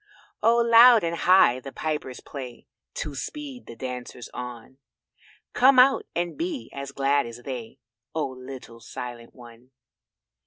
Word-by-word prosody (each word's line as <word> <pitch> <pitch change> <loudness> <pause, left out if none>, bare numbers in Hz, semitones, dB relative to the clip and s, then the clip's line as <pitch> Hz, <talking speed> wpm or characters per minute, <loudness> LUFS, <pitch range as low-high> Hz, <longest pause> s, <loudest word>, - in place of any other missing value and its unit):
Oh 230 +2 +4
loud 235 -1 +7
and 170 0 -1
high 175 -8 +5
the 135 +1 -9
pipers 150 -5 -4
play 130 -4 -9 0.3
To 150 - -4
speed 260 - -7
the 115 - -9
dancers 125 0 -7
on; 125 +1 -8 0.7
Come 260 +1 +5
out 265 +2 +5
and 175 0 -2
be 330 -4 -4
as 140 0 -6
glad 140 -1 +1
as 115 +1 -10
they, 125 -2 -7 0.4
Oh, 155 -4 -1
little 130 -2 -10
Silent 120 0 -8
one. 120 0 -15
135 Hz, 140 wpm, -25 LUFS, -, 0.7 s, loud